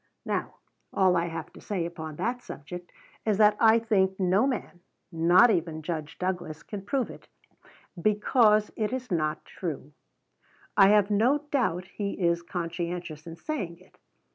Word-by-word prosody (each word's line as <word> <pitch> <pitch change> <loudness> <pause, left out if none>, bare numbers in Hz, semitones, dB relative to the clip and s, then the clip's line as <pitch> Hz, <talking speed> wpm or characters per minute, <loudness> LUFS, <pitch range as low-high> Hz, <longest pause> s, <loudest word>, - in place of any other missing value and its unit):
Now - - -2 0.4
all 185 -2 +3
I 170 0 +1
have 165 -1 -6
to - - -13
say 190 -5 -2
upon 160 -2 -6
that 245 +9 -2
subject 175 +1 -9 0.3
is 215 -3 +1
that 210 -1 +6
I 225 0 +6
think 195 -4 +1
no 190 +6 +3
man 240 -8 -4 0.3
not 175 +8 +5
even 160 -4 -1
Judge 155 -1 -4
Douglas 180 -4 -3
can 205 -2 -6
prove 245 +6 -1
it, - - -14 0.7
because 215 +1 +3
it 215 0 -1
is 255 -3 -4
not 155 -2 -1
true. 150 -5 -6 0.8
I 195 - +7
have 210 0 +4
no 255 +8 +2
doubt 185 - 0
he 200 +1 -4
is 170 -2 +1
"conscientious" 170 -2 -5
in 165 - -7
saying 190 - -4
it. - - -23
185 Hz, 155 wpm, -27 LUFS, 170-215 Hz, 0.8 s, I